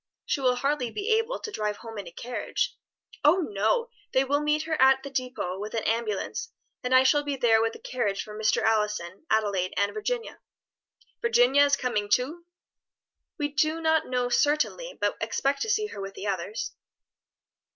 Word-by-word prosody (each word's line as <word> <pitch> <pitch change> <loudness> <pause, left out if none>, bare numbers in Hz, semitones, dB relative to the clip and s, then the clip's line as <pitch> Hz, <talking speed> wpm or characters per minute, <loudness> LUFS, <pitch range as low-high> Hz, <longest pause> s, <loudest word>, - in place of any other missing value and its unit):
She 275 - -1
will 250 -1 +3
hardly 275 -1 0
be 415 - -3
able 455 +3 +2
to 430 - -6
drive 210 - -2
home 225 -2 -8
in 195 - -7
a - - -9
carriage." 245 +8 -3 0.5
"Oh 300 +5 +6
no! 220 - +1 0.2
they 260 - +4
will 285 +2 +1
meet 300 +1 +1
her 320 0 -1
at 265 0 +6
the 280 - -7
depôt 255 -8 -3
with 210 +3 -5
an 225 - -1
ambulance, 230 - -2 0.3
and 250 - -2
I 255 - +7
shall 290 +3 +4
be 290 -1 -2
there 225 -4 +4
with 225 0 0
the - - -9
carriage 210 -6 -2
for 210 - -10
Mr. 215 0 +1
Allison, 210 - 0
Adelaide, 200 -4 +1
and 200 +1 +1
Virginia." 465 +2 -3 0.8
"Virginia 285 - +5
is 280 0 +3
coming 210 -5 -1
too?" 300 +10 0 0.9
"We 290 -1 -1
do 310 +3 +1
not 320 -1 +2
know 250 -1 0
certainly, 300 - +1
but - - 0
expect 275 0 0
to 445 - -1
see 430 0 +2
her 415 - -7
with 195 0 -6
the - - -6
others." 195 +1 -3
255 Hz, 180 wpm, -27 LUFS, 215-300 Hz, 0.9 s, I